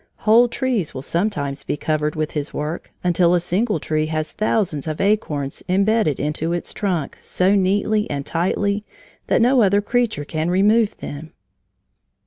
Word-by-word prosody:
Whole 230 +3 +6
trees 240 - -2
will 130 - -5
sometimes 145 -6 -2
be - - -3
covered 150 0 -1
with 155 -1 -2
his 150 -1 -3
work, 150 +3 -4
until 175 0 +3
a - - +3
single 185 +2 0
tree 155 +1 -1
has 155 0 -2
thousands 195 -9 -1
of 155 -1 -3
acorns 155 -9 0
bedded 195 - +1
into 155 +3 -1
its 175 - -3
bark 180 -8 -2
so 185 +2 +1
neatly 205 +2 +1
and 140 -1 -3
tightly 200 +5 0 0.4
that - - +3
no 250 +1 +4
other 200 -1 +4
creature 215 -8 0
can 155 +2 -2
remove 210 +4 +3
them. 155 +3 -8
180 Hz, 155 wpm, -21 LUFS, 155-210 Hz, 0.4 s, Whole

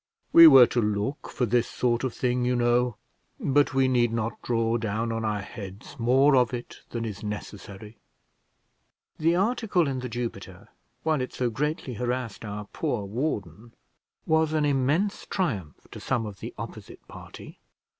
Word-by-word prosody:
We 165 0 +11
were 135 -5 +9
to 120 - 0
look 105 +6 -2
for 125 - -1
this 120 +1 +1
sort 120 -1 0
of 130 - -1
thing, 125 +1 -1
you 125 +1 +1
know; 120 -1 +2 0.4
but 140 -1 +2
we 135 -1 +4
need 120 -2 +2
not 115 0 -3
draw 115 -1 0
down 115 +1 -2
on 115 0 -2
our 105 -2 -1
heads 100 +7 -9
more 135 +5 +4
of 125 -1 +3
it 120 - -8
than 115 -1 -4
is 105 -4 -6
necessary." 105 0 -8 1.2
The 165 +2 +3
article 200 - +1
in 135 -2 -2
The 125 0 -5
Jupiter, 105 -6 -6 0.3
while 155 -3 +1
it 125 - -4
so 125 -2 -1
greatly 150 +1 -2
harassed 125 -2 -3
our 105 -1 -6
poor 125 -10 -2
warden, 110 - -4 0.5
was 160 0 +2
an 155 -1 +2
immense 145 +9 0
triumph 105 - -3
to - - -8
some 120 -4 -1
of 100 -3 -8
the - - -6
opposite - - -9
party. - - -12
120 Hz, 165 wpm, -26 LUFS, 110-135 Hz, 1.2 s, We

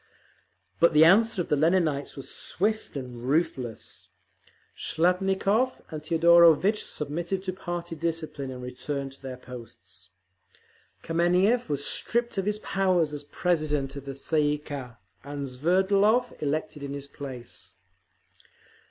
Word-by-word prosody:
But 170 -1 +5
the 155 +1 +7
answer 200 +2 +4
of - - -13
the - - +3
Leninites 155 -2 +1
was 135 - -5
swift 210 -4 -1
and 125 -3 -7
ruthless. 130 -4 -2 0.7
Shliapnikov 195 +8 +1
and 155 -1 -6
Teodorovitch 170 +4 +5
submitted 170 +6 -3
to 185 -1 -3
party 175 -2 -5
discipline 160 -4 -3
and 125 -1 -7
returned 135 +2 -4
to 135 - -17
their 130 -2 -7
posts. 100 -8 -12 0.9
Kameniev 180 +7 +2
was 145 -1 -1
stripped 235 -3 0
of 195 - -2
his 210 0 +1
powers 185 -7 +1
as 145 0 -5
president 150 -4 -1
of 140 -1 -8
the 135 -1 -6
Tsay 155 +3 0
ee - - -1
kah, 135 -5 -8 0.3
and 140 0 -5
Sverdlov 195 - +2
elected 150 0 -2
in 140 0 -5
his 140 0 -6
place. 130 -4 -9
155 Hz, 130 wpm, -27 LUFS, 140-185 Hz, 0.9 s, the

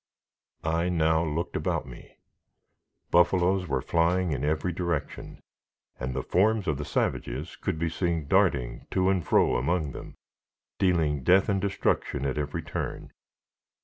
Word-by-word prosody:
I 85 +2 0
now 80 -1 +2
looked 80 +2 -3
about - - -1
me. 65 -3 -13 0.9
Buffaloes 90 +1 +3
were 70 -3 -1
flying 85 +3 +1
in 65 -2 -2
every 75 +4 0
direction, 85 -3 -4 0.6
and 65 0 -3
the - - -2
forms 105 +2 +2
of 75 -2 0
the 75 - -4
savages 65 +6 -2
could 95 -5 -3
be 85 +1 -1
seen 85 -3 -1
darting 70 -11 +1
to 95 0 +2
and 95 -3 0
fro - - +3
among 75 +3 0
them, - - -9 0.6
dealing 80 -6 +2
death 95 - +4
and 100 -1 +1
destruction 90 -7 -1
at 70 +2 -1
every 75 -1 -3
turn. - - -5
85 Hz, 145 wpm, -27 LUFS, 75-90 Hz, 0.9 s, death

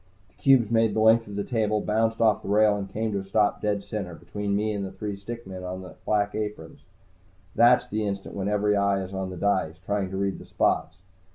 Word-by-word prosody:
The - - -32
cubes 125 -3 +3
made 115 -2 +3
the - - +1
length 110 +1 +5
of 100 - -8
the 100 - -1
table, 110 -2 0
bounced 110 +2 0
off 110 -2 +3
the - - -7
rail 105 0 +4
and 100 -1 -5
came 110 +1 -2
to 100 - -1
a - - -5
stop 105 +2 +1
dead 100 -1 -1
center, 100 -4 -5
between 100 +4 -3
me 105 +1 0
and 100 -1 -3
the 95 - -5
three 105 -2 -5
stick 115 +4 -8
men 95 -1 -7
in 90 +1 -5
the 90 - -10
black 105 -1 +1
aprons. 105 -6 -5 0.7
That's 120 +1 +5
the 110 -2 -2
instant 100 -1 -5
when 100 -1 -3
every 105 0 +2
eye 100 -1 +1
is 95 +1 -8
on 95 -1 -3
the 90 - -7
dice, 95 -5 0
trying 100 -2 -1
to 95 - -5
read 100 0 -1
the - - -11
spots. - - 0
105 Hz, 240 wpm, -26 LUFS, 95-110 Hz, 0.7 s, length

